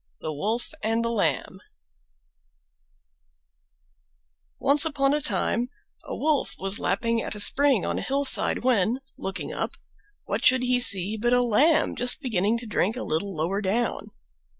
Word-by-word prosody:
THE 155 - -5
WOLF 220 - -3
AND 225 +1 -1
THE 230 - -1
LAMB 165 - -1 3.0
Once 280 +2 +2
upon 285 -3 0
a 300 - 0
time 235 +2 0 0.3
a - - -7
Wolf 300 -1 -1
was 195 +2 +1
lapping 230 -1 -1
at - - -5
a - - -5
spring 265 0 +3
on - - -2
a - - -5
hillside, 275 -2 +3
when, 240 0 +1
looking 190 - -6
up, - - -3 0.5
what - - -4
should 255 0 +4
he 250 0 +1
see 200 -2 +4
but 240 +3 0
a 245 0 +3
Lamb 290 +8 +2
just 245 +3 +2
beginning 225 - 0
to 235 - -7
drink 215 +1 -1
a - - -4
little 185 +5 -3
lower 175 +6 -2
down. 220 +4 -2
230 Hz, 150 wpm, -24 LUFS, 200-260 Hz, 3.0 s, should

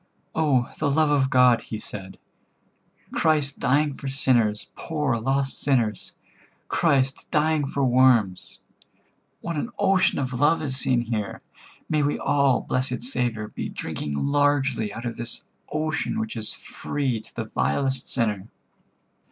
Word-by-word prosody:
"Oh, 140 -6 +1
the 150 - +1
love 155 +1 +2
of 135 -2 +2
God," 125 -3 +5
he 110 - -6
said, 95 -3 -7 0.9
"Christ 150 -3 +1
dying 140 +3 +2
for 135 - -8
sinners, 120 -6 +3
poor 150 -6 -1
lost 135 +4 -1
sinners, 120 -7 0 0.5
Christ 135 -5 +1
dying 155 -1 +1
for 140 0 0
worms! 120 -7 +2 0.8
What 170 -2 -4
an 190 - -2
ocean 190 -1 +3
of 130 -2 -2
love 145 +6 +3
is 135 -3 -1
seen 130 -2 +2
here. 110 -4 -4 0.4
May 155 -1 +1
we 145 0 0
all, 140 -3 +2
blessed 125 -2 -1
Saviour, 120 -4 -2
be - - -5
drinking 75 - -4
largely 140 - +1
out 115 +3 -7
of 120 - -4
this 120 0 -5 0.3
ocean 155 +7 -1
which 220 -1 -4
is 110 -1 -2
free 130 -6 -3
to - - -21
the - - -3
vilest 125 - -1
sinner." 105 -5 -1
130 Hz, 140 wpm, -24 LUFS, 115-145 Hz, 0.9 s, God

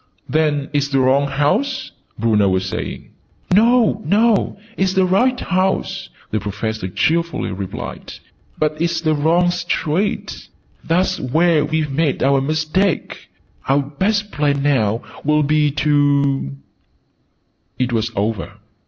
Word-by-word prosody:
"Then 150 -2 0
it's 145 -1 +1
the 135 -1 +1
wrong 135 +2 +3
house?" 185 - 0 0.3
Bruno 105 -3 +2
was 95 0 0
saying. 95 - -5 0.4
"No, 225 +1 +4
no! 215 0 +2 0.2
It's 190 -1 0
the 190 -1 +4
right 245 +8 +2
house," 190 0 -1 0.2
the 110 - 0
Professor 105 0 -4
cheerfully 165 - 0
replied: 95 0 -6 0.4
"but 155 0 -1
it's 170 -1 0
the 155 -1 +1
wrong 165 +4 +2
street. 175 +2 -2 0.4
That's 185 +3 +1
where 155 +4 +2
we've 155 -1 -1
made 145 -1 0
our 135 0 +3
mistake! 155 +6 -1 0.4
Our 140 +1 +3
best 205 +9 -1
plan, 145 -2 0
now, 115 -6 +1 0.2
will 150 +1 +2
be 150 +1 +2
to 140 - +1 0.5
" - - -46
It 125 -1 -2
was 115 0 0
over. 105 +1 -2
150 Hz, 125 wpm, -19 LUFS, 135-180 Hz, 0.5 s, No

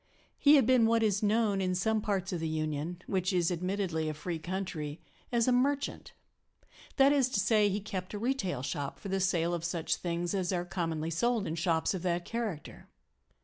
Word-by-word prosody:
He 295 0 +7
had 270 -5 +5
been 245 -2 +5
what 230 0 +3
is 205 -2 +2
known 210 -2 +2
in 185 -1 0
some 215 +4 +1
parts 195 -3 -1
of 175 - -2
the 160 - -2
Union 155 +2 -3
(which 185 -1 0
is 180 -2 +1
admittedly 175 -3 -1
a 155 - -4
free 165 +2 -4
country) 165 -4 -4 0.3
as 235 -1 +2
a - - +4
"merchant"; 280 +3 0 0.8
that 275 0 +6
is 270 -3 +3
to 210 - 0
say, 210 0 +3
he 200 +1 -1
kept 195 -1 -5
a - - -2
retail 205 - -1
shop 145 -1 -3
for 200 - -8
the 195 0 0
sale 175 -2 +1
of 170 -1 -3
such 170 -1 -1
things 175 0 -2
as 185 -2 0
are 175 -1 -1
commonly 165 -3 -2
sold 230 +5 +1
in 160 - -3
shops 165 +1 +1
of 185 - -4
that 175 -1 -1
character. 225 -9 -5
185 Hz, 200 wpm, -31 LUFS, 170-215 Hz, 0.8 s, He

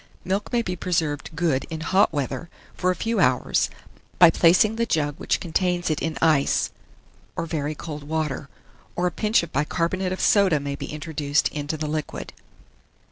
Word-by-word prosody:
Milk 195 +2 -2
may 240 -1 +1
be 180 -4 -3
preserved 160 -5 -1
good 155 -5 0
in 160 -1 -5
hot 190 +5 +3
weather, 145 +3 -3 0.2
for 185 - 0
a 185 - +2
few 225 +1 -1
hours, 130 -8 +2 0.5
by 175 -2 +8
placing 185 +7 +4
the 230 0 0
jug 145 -5 0
which - - 0
contains 175 0 0
it 155 - -1
in 160 -1 -2
ice, 155 -4 +3 0.6
or - - -2
very 155 -2 -3
cold 150 -1 -7
water; 150 -2 -2 0.5
or 175 - 0
a 180 - +1
pinch 215 -1 +2
of 170 - -8
bicarbonate 170 +6 0
of 185 - -3
soda 195 -7 +4
may 140 0 -4
be - - -6
introduced 150 -1 -1
into 150 +1 -4
the 155 - -3
liquid. 150 - -4
160 Hz, 175 wpm, -24 LUFS, 150-180 Hz, 0.6 s, by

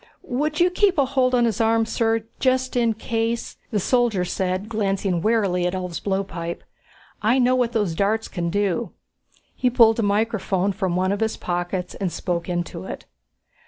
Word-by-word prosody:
"Would 300 +5 -2
you 355 +1 +4
keep 380 0 +2
a 280 - +4
hold 255 -1 +2
on 240 -1 +3
his 230 -2 0
arm, 225 0 +3
sir, 225 0 0 0.2
just 255 -1 +1
in 235 -2 +2
case," 230 +1 -2
the 210 - 0
soldier 230 -4 +2
said, 185 +2 -2
glancing 195 -5 -1
warily 195 -4 +1
at 180 - -2
Ulv's 180 -2 -4
blowpipe. 190 -4 -3 0.6
"I 225 +5 +3
know 255 0 +4
what 245 -2 +1
those 205 -7 0
darts 210 +5 0
can 170 -2 -3
do." 200 +2 -1 0.6
He 250 - +1
pulled 230 -2 +5
a - - +3
microphone 205 -2 +1
from 190 -3 -2
one 185 +1 +1
of 200 - -1
his 220 0 -1
pockets 175 +1 -3
and 190 -3 -3
spoke 170 +1 -3
into 175 - -3
it. - - -7
215 Hz, 175 wpm, -23 LUFS, 185-235 Hz, 0.6 s, pulled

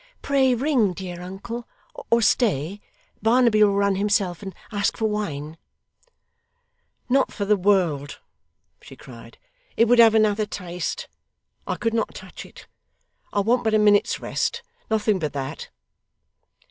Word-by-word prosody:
'Pray 265 -3 +2
ring, 245 -7 +1
dear 180 -1 -7
uncle 200 +6 -7 0.4
or 230 0 +3
stay 200 - +1 0.4
Barnaby 230 -2 +4
will 200 -1 +3
run 200 -1 +1
himself 200 -3 0
and 195 -3 -8 0.2
ask 205 -1 -1
for 220 - -1
wine 160 -8 -3 0.8
' - - -49
'Not 270 +2 +2
for 200 - -4
the 210 +1 +3
world,' 180 -8 +1 0.6
she - - -13
cried. - - -14 0.4
'It 230 - +5
would 240 +1 +4
have 225 -1 +7
another 215 -1 +2
taste 180 -3 -5 0.6
I - - -1
could 230 -1 -2
not 230 - -1
touch - - -10
it. - - -15 0.7
I 205 - +1
want 240 +4 +1
but 220 -1 +1
a - - +5
minute's 210 -1 +3
rest. 470 - -2 0.3
Nothing 215 -2 +1
but 150 -4 -3
that. 135 -1 -5
205 Hz, 145 wpm, -23 LUFS, 185-230 Hz, 0.8 s, have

